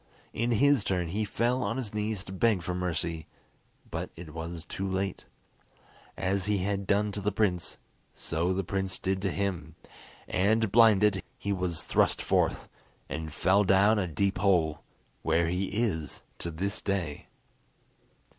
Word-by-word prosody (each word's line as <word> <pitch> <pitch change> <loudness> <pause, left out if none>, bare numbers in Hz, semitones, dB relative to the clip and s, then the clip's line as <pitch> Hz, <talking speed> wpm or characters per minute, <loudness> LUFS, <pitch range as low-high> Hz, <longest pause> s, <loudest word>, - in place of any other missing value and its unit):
In 115 +2 0
his 140 0 +4
turn 90 -4 -1
he 105 +5 -1
fell 120 +5 0
on 120 -1 -1
his 115 -6 -4
knees 105 -2 -2
to 95 - -10
beg 95 -1 +2
for 90 - -2
mercy, 85 -3 -2 0.6
but - - -3
it 80 -2 -10
was 80 +1 -6
too 95 +2 -4
late. 95 0 -2 0.9
As 95 0 0
he 105 0 +1
had 100 +1 -1
done 105 +1 +2
to 100 - -4
the 105 +2 0
prince, 95 -6 0 0.4
so 85 +3 -1
the 95 +1 0
prince 95 0 -2
did 95 0 -1
to 100 - 0
him, 85 -5 -3 0.5
and, 105 +3 +2
blinded, 105 -3 +5 0.2
he 100 - -2
was 90 -4 -1
thrust - - +2
forth, - - +1 0.4
and 80 +3 -4
fell 95 +6 +3
down 100 +3 +4
a 95 - 0
deep 95 +3 0
hole, 85 -6 +2 0.4
where 85 0 +2
he 90 +3 0
is 100 -9 -2 0.2
to 85 - -4
this 95 +5 -3
day. 90 -7 -2
95 Hz, 155 wpm, -29 LUFS, 85-105 Hz, 0.9 s, blinded